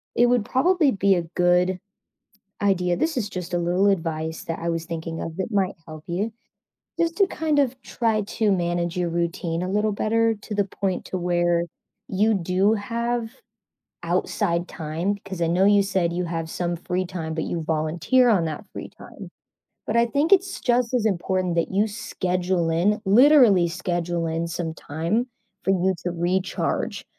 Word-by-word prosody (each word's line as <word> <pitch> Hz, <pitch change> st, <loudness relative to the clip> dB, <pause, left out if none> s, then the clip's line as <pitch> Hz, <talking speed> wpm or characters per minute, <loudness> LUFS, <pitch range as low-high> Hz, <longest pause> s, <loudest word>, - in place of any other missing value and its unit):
it 240 Hz, -, +5 dB
would 240 Hz, -3 st, +2 dB
probably 315 Hz, -, +3 dB
be 195 Hz, -3 st, +3 dB
a 175 Hz, -, 0 dB
good 180 Hz, +1 st, +3 dB, 0.8 s
Idea, 180 Hz, -3 st, +2 dB
this 320 Hz, -2 st, -1 dB
is 220 Hz, -4 st, 0 dB
just 180 Hz, -2 st, -6 dB
a -, -, +2 dB
little 175 Hz, +3 st, +2 dB
advice 160 Hz, -3 st, -2 dB
that 165 Hz, -, -4 dB
I 170 Hz, -, -2 dB
was 165 Hz, 0 st, -2 dB
thinking 165 Hz, -1 st, -5 dB
of 165 Hz, -1 st, -5 dB
that 190 Hz, +4 st, -3 dB
might 195 Hz, -2 st, +1 dB
help 155 Hz, -1 st, -9 dB
you, 195 Hz, +6 st, -2 dB, 0.7 s
just 335 Hz, 0 st, 0 dB
to 395 Hz, -, +5 dB
kind 310 Hz, -4 st, 0 dB
of 265 Hz, -2 st, 0 dB
try 225 Hz, -3 st, 0 dB
to 210 Hz, +1 st, 0 dB
manage 175 Hz, -1 st, 0 dB
your 175 Hz, -1 st, 0 dB
routine 170 Hz, 0 st, -2 dB
a 185 Hz, -, -3 dB
little 210 Hz, +2 st, +1 dB
better 225 Hz, +2 st, +1 dB
to 210 Hz, -, -5 dB
the 205 Hz, -, +2 dB
point 190 Hz, -1 st, -3 dB
to 185 Hz, -, -4 dB
where 175 Hz, -1 st, +1 dB, 0.4 s
you 210 Hz, +3 st, +2 dB
do 185 Hz, +3 st, +2 dB
have 235 Hz, +2 st, -2 dB, 0.7 s
outside 170 Hz, 0 st, -1 dB
time 165 Hz, +5 st, -2 dB
'cause 190 Hz, -3 st, -7 dB
I -, -, +3 dB
know 180 Hz, +3 st, +3 dB
you 205 Hz, 0 st, +5 dB
said 190 Hz, -3 st, 0 dB
you 180 Hz, +1 st, -2 dB
have 165 Hz, -1 st, -4 dB
some 175 Hz, 0 st, -2 dB
free 180 Hz, +2 st, -2 dB
time, 170 Hz, -3 st, -5 dB
but 160 Hz, -, -2 dB
you 170 Hz, -, -3 dB
volunteer 160 Hz, +11 st, +2 dB
on 200 Hz, -7 st, +3 dB
that 155 Hz, -2 st, -5 dB
free -, -, -7 dB
time, -, -, -12 dB, 0.6 s
but 215 Hz, -, -1 dB
I 235 Hz, 0 st, +4 dB
think 290 Hz, -, +3 dB
it's 385 Hz, 0 st, +2 dB
just 245 Hz, -1 st, +1 dB
as 240 Hz, -3 st, +1 dB
important 185 Hz, -2 st, 0 dB
that 170 Hz, -, 0 dB
you 200 Hz, +3 st, +2 dB
schedule 185 Hz, -4 st, -1 dB
in, 190 Hz, +7 st, +1 dB
literally 225 Hz, -, +6 dB
schedule 175 Hz, -1 st, -2 dB
in 165 Hz, +1 st, -1 dB
some 165 Hz, -1 st, -4 dB
time 170 Hz, -, -2 dB, 0.4 s
for 195 Hz, -, +2 dB
you 190 Hz, 0 st, +2 dB
to 175 Hz, -, 0 dB
recharge 180 Hz, +2 st, -1 dB
185 Hz, 180 wpm, -24 LUFS, 170-215 Hz, 0.8 s, literally